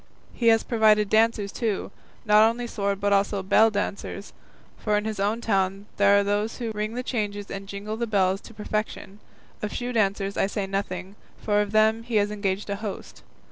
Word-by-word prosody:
He 235 - -1
has 225 -1 +5
provided 215 -3 +3
dancers 220 -2 +2
too, 220 -5 -2 0.3
not 215 +1 +6
only 240 +1 -4
sword 200 -4 -2
but 205 0 +1
also 200 0 +1
bell 215 +4 +5
dancers, 200 -1 -4 0.4
for 210 -1 0
in 210 - -2
his 215 -2 -3
own 210 +4 0
town 195 -2 0
there 200 0 +5
are 200 - +3
those 205 +2 -1
who 235 -3 -3
ring 215 +1 -3
the 250 - -3
changes 205 -5 -3
and 195 0 -6
jingle 205 +2 -5
the 235 0 -2
bells 195 -2 +1
to 230 - -13
perfection; 210 -1 -4 0.4
of 210 - -3
shoe 245 0 -4
dancers 200 -2 0
I - - +2
say 200 0 -3
nothing, 195 0 -4 0.3
for 210 -1 +2
of 205 -1 -3
them 220 +1 +3
he 230 0 -5
has 205 0 +2
engaged 200 -1 -2
a 200 - -2
host. 210 -2 -7
210 Hz, 195 wpm, -25 LUFS, 200-220 Hz, 0.4 s, not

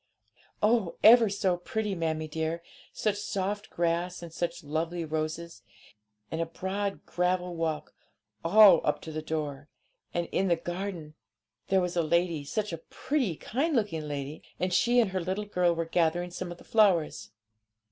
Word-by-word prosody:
'Oh, 215 -5 +2
ever 230 -1 +8
so 195 -3 +1
pretty, 210 +3 -2
mammie 160 -3 -2
dear; 160 +2 -3 0.3
such 210 -2 -1
soft 205 +1 -3
grass 175 +1 -1
and 165 -1 -9
such 170 0 -3
lovely 165 +3 -2
roses, 160 +2 -4 0.7
and 160 - -1
a - - +1
broad 195 +4 -3
gravel 180 0 0
walk 160 -2 -2 0.5
all 190 0 +8
up 150 - +1
to 160 - -7
the 155 0 -4
door. 150 -2 -4 0.4
And 175 -1 -1
in 195 - +1
the 175 - +4
garden 175 -2 -5 0.5
there 190 -1 +3
was 180 -1 -2
a 170 - +3
lady; 170 -1 +1
such 210 +5 -2
a 165 - -4
pretty, 255 - -2
kind 280 - -1
looking 165 -10 -1
lady! 145 +1 -5 0.2
and 180 0 0
she 240 +6 +4
and 220 -5 +2
her 185 -1 -1
little 190 +4 -2
girl 180 -4 +2
were 165 0 -1
gathering 175 +1 +1
some 175 0 -5
of 175 - -8
the - - -15
flowers.' 170 - +2
175 Hz, 165 wpm, -29 LUFS, 160-195 Hz, 0.7 s, ever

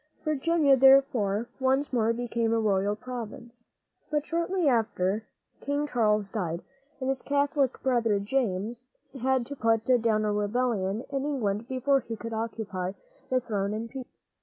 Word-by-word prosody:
Virginia, 305 -1 +3
therefore, 260 -6 +4
once 265 +2 +1
more 230 -2 +3
became 235 -1 -1
a 230 - +2
royal 205 -1 +1
province. 240 0 -8 0.4
But 300 -1 0
shortly 340 +1 0
after, 215 -4 +1 0.4
King 285 +1 0
Charles 215 -6 +1
died, 175 -5 -3 0.4
and 260 - -3
his 270 -1 -1
Catholic 285 -2 +1
brother, 230 -5 +2
James, 225 +1 -2 0.3
had 260 -1 +2
to 285 - -7
put 225 -3 +1 0.2
down 215 -2 +2
a 210 - +1
rebellion 210 -1 0
in 275 -1 -1
England 230 -7 -1
before 270 +2 +2
he 230 -2 -6
could 230 +1 -6
occupy 215 -5 -3 0.4
the 255 - +3
throne 210 -4 -2
in 230 +1 -4
peace. 260 -1 -7
235 Hz, 145 wpm, -28 LUFS, 215-270 Hz, 0.4 s, therefore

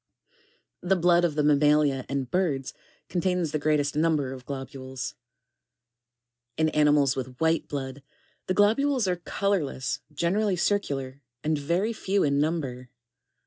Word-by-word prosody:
25. 180 - -8
The 195 -1 +4
blood 175 0 +4
of 165 -4 +1
the 150 - +1
mammalia 145 -2 +3
and 135 -2 -3
birds 155 -8 0 0.3
contains 180 -3 0
the 155 - -1
greatest 145 -1 +1
number 150 -4 +1
of 130 -1 -11
globules. 130 -1 -6 1.4
2(3. - - -1
In 155 - +4
animals 150 -3 +3
with 130 -1 -6
white 160 0 +1
blood, 135 -1 -5 0.5
the 185 - 0
globules 230 +4 +3
are 180 -1 0
colourless, 175 -8 -1
generally 185 +6 +1
circular, 140 -9 -1 0.2
and 155 +1 +1
very 175 +10 0
few 200 -2 0
in 140 -1 +2
number. 140 -6 -2
150 Hz, 140 wpm, -26 LUFS, 135-180 Hz, 1.4 s, The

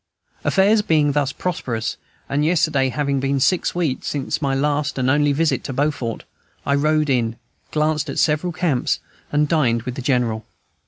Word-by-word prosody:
Affairs 205 +2 +4
being 155 -7 +2
thus 140 -1 0
prosperous, 125 -9 -3 0.3
and 145 +1 0
yesterday 155 -5 +2
having 140 0 -1
been 135 +1 0
six 175 +7 +1
weeks 160 -7 -1
since 140 +1 -2
my 135 -2 0
last 145 +1 0
and 130 0 +2
only 145 0 +3
visit 160 +3 +1
to 135 - -4
Beaufort, 135 -4 -1 0.4
I 140 - +1
rode 150 +2 +2
in, 115 -3 +1 0.3
glanced 155 0 0
at - - -4
several 155 +3 +2
camps, 160 -7 0 0.3
and 150 0 +2
dined 125 -8 +1
with 125 0 -4
the 135 - -6
General. 120 -4 0
145 Hz, 165 wpm, -21 LUFS, 130-155 Hz, 0.4 s, Affairs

